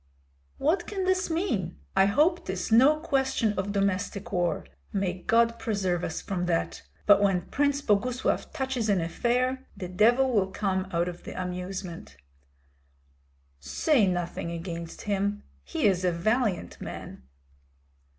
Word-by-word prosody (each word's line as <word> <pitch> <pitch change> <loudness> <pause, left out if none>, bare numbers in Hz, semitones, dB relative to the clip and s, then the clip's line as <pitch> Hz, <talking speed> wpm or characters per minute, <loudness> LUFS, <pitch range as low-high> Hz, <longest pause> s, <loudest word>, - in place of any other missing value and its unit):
"What 345 +4 +1
can 390 -2 -2
this 375 0 +1
mean? 280 - -1 0.2
I 195 0 +5
hope 315 - +3
'tis 185 +2 -3
no 260 +7 +7
question 265 -7 +1
of 200 0 -2
domestic 200 0 -1
war. 175 -1 0 0.3
May 190 -2 -1
God 230 0 +3
preserve 190 -5 -1
us 160 - -3
from 180 -2 -2
that! 165 -1 -1 0.2
But 205 -1 +6
when 195 -3 +2
Prince 285 0 +1
Boguslav 240 +4 0
touches 265 -6 -2
an 200 -2 +3
affair 250 +9 0
the 180 - -5
devil 240 +8 +4
will 200 -5 +2
come 190 -1 -1
of 175 0 -2
the - - -7
amusement." 180 - -5 1.4
"Say 230 - +2
nothing 175 -2 -2
against 170 0 -6
him; 205 0 -1 0.2
he 70 - -2
is 185 -3 +3
a 180 - +3
valiant 210 +2 0
man." - - -7
200 Hz, 135 wpm, -27 LUFS, 180-255 Hz, 1.4 s, no